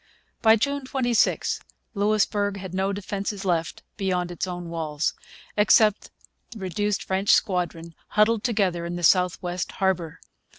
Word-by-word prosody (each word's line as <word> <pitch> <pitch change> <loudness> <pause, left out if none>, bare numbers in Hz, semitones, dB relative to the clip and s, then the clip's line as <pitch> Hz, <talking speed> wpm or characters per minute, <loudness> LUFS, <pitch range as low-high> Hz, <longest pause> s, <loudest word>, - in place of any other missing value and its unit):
By 220 -1 +6
June 280 +5 -1
26 245 -4 +1 0.3
Louisbourg 205 -1 +1
had 190 -2 -7
no 190 +1 0
defences 200 0 -4
left 170 -3 -1
beyond 180 -3 -1
its 175 - -3
own 175 -1 -5
walls, 155 -2 -2 0.4
except 210 0 +4 0.4
the 230 - -10
reduced 205 +1 -2
French 190 +1 -1
squadron 170 -3 +1
huddled 215 +1 +2
together 195 -8 0
in 170 +1 -4
the 175 - -5
south 180 +1 +4
west 180 0 -3
harbour. 185 -5 -1
190 Hz, 135 wpm, -25 LUFS, 175-210 Hz, 0.4 s, By